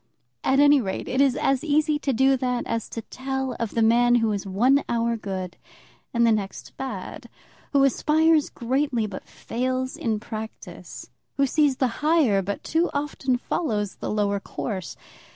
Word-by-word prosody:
At 270 Hz, -, +3 dB
any 290 Hz, -1 st, +6 dB
rate, 190 Hz, -4 st, -4 dB
it 260 Hz, +2 st, +1 dB
is 270 Hz, -3 st, +4 dB
as 270 Hz, +1 st, +1 dB
easy 305 Hz, -1 st, +2 dB
to 280 Hz, -, -1 dB
do 265 Hz, +2 st, +4 dB
that 250 Hz, -1 st, -1 dB
as 230 Hz, -1 st, -3 dB
to 230 Hz, -, -6 dB
tell 265 Hz, +1 st, -4 dB
of 230 Hz, -2 st, -3 dB
the 230 Hz, -, +3 dB
man 240 Hz, +2 st, +4 dB
who 225 Hz, -2 st, +2 dB
is 200 Hz, -1 st, -3 dB
one 250 Hz, +9 st, +3 dB
hour 235 Hz, 0 st, +1 dB
good 190 Hz, -4 st, -5 dB, 0.5 s
and 235 Hz, -1 st, +3 dB
the 230 Hz, -, +4 dB
next 200 Hz, -3 st, -3 dB
bad, 265 Hz, -1 st, -6 dB, 0.4 s
who 280 Hz, -1 st, +4 dB
aspires 310 Hz, +3 st, +3 dB
greatly 250 Hz, -1 st, -1 dB
but 200 Hz, -3 st, -8 dB
fails 255 Hz, +2 st, -3 dB
in 220 Hz, -3 st, -1 dB
practice, 220 Hz, 0 st, -8 dB, 0.3 s
who 275 Hz, -, +4 dB
sees 285 Hz, -1 st, +2 dB
the 255 Hz, -2 st, -1 dB
higher 300 Hz, -11 st, +3 dB
but 200 Hz, +2 st, -4 dB
too 330 Hz, +2 st, +1 dB
often 285 Hz, -3 st, -1 dB
follows 215 Hz, -, -2 dB
the -, -, -5 dB
lower 205 Hz, -1 st, 0 dB
course. 195 Hz, -3 st, -5 dB
250 Hz, 170 wpm, -24 LUFS, 220-275 Hz, 0.5 s, any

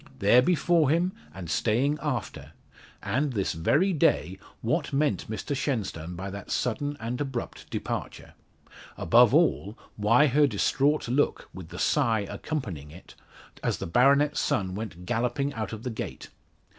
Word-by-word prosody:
There 105 Hz, +5 st, +5 dB
before 170 Hz, 0 st, +2 dB
him, 170 Hz, +4 st, +2 dB, 0.2 s
and 95 Hz, -3 st, -8 dB
staying 125 Hz, -, +1 dB
after! 130 Hz, -7 st, -4 dB, 0.5 s
And 140 Hz, +2 st, 0 dB
this 100 Hz, -4 st, -1 dB
very 145 Hz, -, +2 dB
day, 95 Hz, -, +1 dB, 0.2 s
what 150 Hz, +7 st, -1 dB
meant 140 Hz, -10 st, 0 dB
Mr 125 Hz, +6 st, -3 dB
Shenstone 100 Hz, -, -3 dB
by 95 Hz, +2 st, -5 dB
that 100 Hz, 0 st, -8 dB
sudden 145 Hz, +4 st, -1 dB
and 120 Hz, +4 st, -4 dB
abrupt 135 Hz, -4 st, -5 dB
departure? -, -, -5 dB, 0.6 s
Above 120 Hz, +7 st, +5 dB
all, 140 Hz, -, +2 dB, 0.2 s
why 115 Hz, +7 st, +4 dB
her 145 Hz, +1 st, +4 dB
distraught 140 Hz, +6 st, +1 dB
look, 130 Hz, +5 st, 0 dB
with 90 Hz, -3 st, -9 dB
the -, -, -9 dB
sigh 110 Hz, -2 st, +2 dB
accompanying 100 Hz, -, -5 dB
it, 85 Hz, +5 st, -14 dB, 0.5 s
as -, -, -1 dB
the -, -, -5 dB
baronet's 140 Hz, -, +3 dB
son 95 Hz, -2 st, 0 dB
went 95 Hz, -4 st, -6 dB
galloping 125 Hz, +6 st, -1 dB
out 110 Hz, -1 st, -4 dB
of 110 Hz, 0 st, -7 dB
the 125 Hz, -, -3 dB
gate? 110 Hz, -, -6 dB
120 Hz, 145 wpm, -27 LUFS, 100-145 Hz, 0.6 s, There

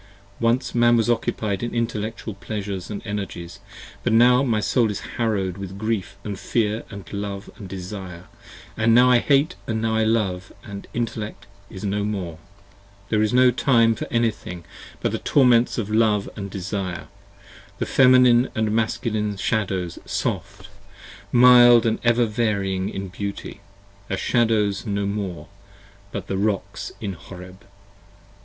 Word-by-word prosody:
65 -, -, -7 dB
Once 120 Hz, +3 st, +1 dB
Man 120 Hz, 0 st, +4 dB
was 115 Hz, +1 st, +2 dB
occupied 110 Hz, -3 st, -1 dB
in 120 Hz, 0 st, -4 dB
intellectual 115 Hz, -1 st, -3 dB
pleasures 100 Hz, -2 st, -5 dB
& -, -, -18 dB
energies, 100 Hz, -5 st, -5 dB, 0.4 s
But 120 Hz, -, 0 dB
now 125 Hz, +3 st, +6 dB
my 115 Hz, -6 st, +1 dB
Soul 115 Hz, +1 st, +2 dB
is 105 Hz, -, -4 dB, 0.2 s
harrow'd 100 Hz, -6 st, -1 dB
with 95 Hz, 0 st, -7 dB
grief 105 Hz, -4 st, -2 dB
& 100 Hz, -, -3 dB
fear 110 Hz, +1 st, -1 dB, 0.2 s
& -, -, -16 dB
love 100 Hz, 0 st, -5 dB
& 100 Hz, -, -8 dB
desire, 95 Hz, -1 st, -7 dB, 0.5 s
And 115 Hz, +1 st, +3 dB
now 125 Hz, +1 st, +6 dB
I 125 Hz, -, +6 dB
hate 145 Hz, +6 st, +2 dB
& -, -, -25 dB
now 110 Hz, 0 st, -1 dB
I 110 Hz, -, +2 dB
love 105 Hz, -5 st, 0 dB, 0.2 s
& 100 Hz, 0 st, -9 dB
Intellect 115 Hz, -2 st, -4 dB, 0.2 s
is 95 Hz, -, -9 dB
no 100 Hz, 0 st, -1 dB
more: 95 Hz, -6 st, -4 dB, 0.7 s
There 105 Hz, -1 st, +2 dB
is 110 Hz, -1 st, +1 dB
no 125 Hz, 0 st, +5 dB
time 115 Hz, -2 st, +3 dB
for -, -, -6 dB
any 115 Hz, -1 st, +2 dB
thing 90 Hz, -4 st, -9 dB, 0.4 s
but -, -, 0 dB
the -, -, -2 dB
torments 125 Hz, -3 st, +3 dB
of 110 Hz, -3 st, -3 dB
love 110 Hz, -2 st, +2 dB
& 100 Hz, -, -5 dB
desire: 95 Hz, -1 st, -4 dB, 0.7 s
The -, -, -2 dB
Feminine 125 Hz, -1 st, +5 dB
& -, -, -29 dB, 0.2 s
Masculine 110 Hz, -2 st, -1 dB
Shadows 95 Hz, -5 st, -1 dB
soft, -, -, -3 dB, 0.6 s
mild 120 Hz, -1 st, +7 dB
& -, -, -23 dB
ever 120 Hz, 0 st, +3 dB
varying 100 Hz, -4 st, -1 dB
70 -, -, -7 dB
In 95 Hz, 0 st, -4 dB
beauty, 100 Hz, +1 st, -6 dB, 0.5 s
are 100 Hz, -, -1 dB
Shadows 110 Hz, -4 st, +1 dB
now 100 Hz, -3 st, -2 dB
no -, -, -1 dB
more, 100 Hz, -3 st, -4 dB, 0.6 s
but -, -, -5 dB
Rocks 100 Hz, +1 st, -2 dB
in 100 Hz, -3 st, -4 dB
Horeb. 90 Hz, +2 st, -12 dB
105 Hz, 155 wpm, -23 LUFS, 100-115 Hz, 0.7 s, mild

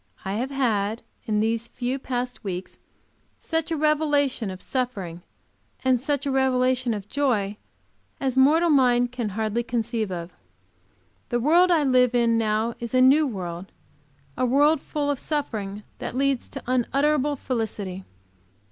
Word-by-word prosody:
I 190 Hz, -, -2 dB
have 245 Hz, +6 st, -2 dB
had 225 Hz, -5 st, 0 dB, 0.2 s
in 210 Hz, -1 st, +1 dB
these 225 Hz, +1 st, 0 dB
few 250 Hz, +3 st, -3 dB
past 250 Hz, -1 st, -4 dB
weeks 185 Hz, -2 st, -5 dB, 0.6 s
such 325 Hz, -1 st, -2 dB
a 325 Hz, -, -1 dB
revelation 290 Hz, -6 st, +1 dB
of 185 Hz, -1 st, -7 dB
suffering, 200 Hz, -11 st, -3 dB, 0.6 s
and 255 Hz, -1 st, +4 dB
such 285 Hz, +2 st, -1 dB
a 280 Hz, -, 0 dB
revelation 255 Hz, -2 st, +2 dB
of 205 Hz, -1 st, -7 dB
joy, 215 Hz, -7 st, 0 dB, 0.6 s
as 265 Hz, -2 st, -1 dB
mortal 315 Hz, +6 st, +5 dB
mind 245 Hz, -3 st, +4 dB
can 240 Hz, -3 st, -3 dB
hardly 220 Hz, +1 st, 0 dB
conceive 230 Hz, -3 st, -2 dB
of. 175 Hz, 0 st, -5 dB, 1.0 s
The 240 Hz, -, 0 dB
world 335 Hz, +8 st, +4 dB
I 330 Hz, -4 st, +4 dB
live 250 Hz, -2 st, +3 dB
in 235 Hz, -1 st, +3 dB
now 220 Hz, +1 st, 0 dB
is 235 Hz, +1 st, -4 dB
a -, -, +5 dB
new 285 Hz, +4 st, +6 dB
world; 180 Hz, -5 st, -6 dB, 0.6 s
a -, -, -1 dB
world 285 Hz, +4 st, +4 dB
full 290 Hz, -1 st, -2 dB
of 280 Hz, -, -3 dB
suffering 215 Hz, -9 st, -3 dB, 0.2 s
that -, -, -5 dB
leads 275 Hz, -2 st, 0 dB
to -, -, -8 dB
unutterable 280 Hz, +4 st, +1 dB
felicity. 210 Hz, -7 st, -4 dB
250 Hz, 145 wpm, -25 LUFS, 220-275 Hz, 1.0 s, new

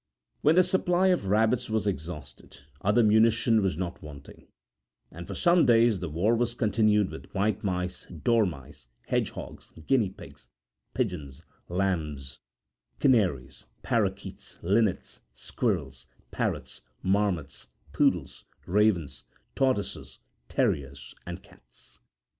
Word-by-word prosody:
When 155 Hz, +2 st, +4 dB
the 185 Hz, -, +6 dB
supply 185 Hz, 0 st, +2 dB
of 180 Hz, -, +1 dB
rabbits 110 Hz, +4 st, +2 dB
was 110 Hz, -1 st, 0 dB
exhausted, 75 Hz, -7 st, -6 dB, 0.2 s
other 105 Hz, +4 st, +3 dB
munition 110 Hz, +1 st, +4 dB
was 95 Hz, -5 st, 0 dB
not 90 Hz, -1 st, -4 dB
wanting, 70 Hz, -2 st, -12 dB, 0.6 s
and 85 Hz, +1 st, -9 dB
for -, -, -6 dB
some 170 Hz, -1 st, +4 dB
days 115 Hz, -3 st, +4 dB
the 90 Hz, -2 st, -4 dB
war 95 Hz, +10 st, +1 dB
was 120 Hz, 0 st, -1 dB
continued 105 Hz, -3 st, +2 dB
with -, -, -10 dB
white 105 Hz, +1 st, 0 dB
mice, 90 Hz, -2 st, -3 dB
dormice, 80 Hz, -, -1 dB, 0.2 s
hedgehogs, -, -, -3 dB, 0.2 s
guinea 120 Hz, -8 st, +2 dB
pigs, -, -, -14 dB, 0.5 s
pigeons, 90 Hz, -, -3 dB, 0.3 s
lambs, 80 Hz, -8 st, -2 dB, 0.6 s
canaries, 90 Hz, -, +1 dB, 0.2 s
parakeets, -, -, -2 dB
linnets, 100 Hz, +2 st, 0 dB
squirrels, -, -, -3 dB, 0.2 s
parrots, -, -, -3 dB, 0.2 s
marmots, 95 Hz, -7 st, -1 dB, 0.3 s
poodles, -, -, +1 dB, 0.2 s
ravens, 95 Hz, -5 st, +1 dB, 0.3 s
tortoises, 130 Hz, -7 st, -1 dB, 0.3 s
terriers, 70 Hz, -2 st, -1 dB
and 90 Hz, +2 st, -7 dB
cats. 60 Hz, -11 st, -16 dB
100 Hz, 110 wpm, -27 LUFS, 80-115 Hz, 0.6 s, the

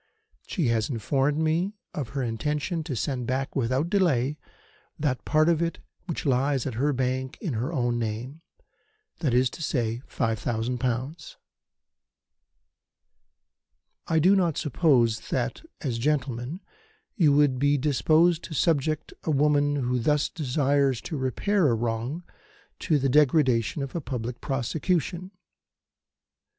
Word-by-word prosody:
She 165 Hz, -, 0 dB
has 110 Hz, -2 st, +1 dB
informed 135 Hz, +4 st, 0 dB
me 165 Hz, +6 st, 0 dB, 0.2 s
of 135 Hz, -6 st, -4 dB
her 135 Hz, -, 0 dB
intention 150 Hz, +8 st, -2 dB
to 145 Hz, -6 st, -3 dB
send 125 Hz, 0 st, -2 dB
back 135 Hz, +1 st, -2 dB
without 130 Hz, +4 st, +1 dB
delay 150 Hz, -8 st, +1 dB, 0.6 s
that 130 Hz, -7 st, -1 dB
part 155 Hz, +1 st, +3 dB
of 170 Hz, -1 st, +3 dB
it 170 Hz, 0 st, -1 dB, 0.3 s
which 170 Hz, -, -4 dB
lies 135 Hz, 0 st, +1 dB
at 130 Hz, -, -3 dB
her 140 Hz, +6 st, +1 dB
bank 130 Hz, 0 st, -2 dB
in 170 Hz, -, -3 dB
her 120 Hz, +7 st, -2 dB
own 120 Hz, -6 st, 0 dB
name 120 Hz, +7 st, -4 dB, 0.8 s
that 145 Hz, -7 st, 0 dB
is 125 Hz, +2 st, +4 dB
to -, -, -9 dB
say, 120 Hz, -6 st, -1 dB
five 115 Hz, -1 st, -1 dB
thousand 120 Hz, +1 st, -2 dB
pounds. 130 Hz, -, -3 dB, 2.7 s
"I 165 Hz, -, +1 dB
do 180 Hz, +6 st, +5 dB
not 170 Hz, -5 st, +1 dB
suppose 130 Hz, -7 st, +2 dB
that, -, -, -2 dB, 0.2 s
as 120 Hz, -4 st, -2 dB
gentlemen, 135 Hz, -, -1 dB, 0.5 s
you 160 Hz, -, +4 dB
would 140 Hz, -3 st, +3 dB
be 145 Hz, +1 st, +3 dB
disposed 155 Hz, +4 st, +3 dB
to 160 Hz, -, -7 dB
subject 155 Hz, 0 st, 0 dB
a -, -, -3 dB
woman 145 Hz, 0 st, +3 dB
who 125 Hz, -2 st, 0 dB
thus 150 Hz, +4 st, +1 dB
desires 140 Hz, -3 st, +1 dB
to 165 Hz, -, -5 dB
repair 155 Hz, -, +1 dB
a 120 Hz, -, +3 dB
wrong 120 Hz, +8 st, -2 dB, 0.6 s
to 155 Hz, -4 st, +2 dB
the 135 Hz, -1 st, +1 dB
degradation 135 Hz, -2 st, +3 dB
of 135 Hz, -, -6 dB
a 170 Hz, -, -1 dB
public 120 Hz, -3 st, -5 dB
prosecution. 165 Hz, +6 st, -1 dB
140 Hz, 140 wpm, -26 LUFS, 125-155 Hz, 2.7 s, do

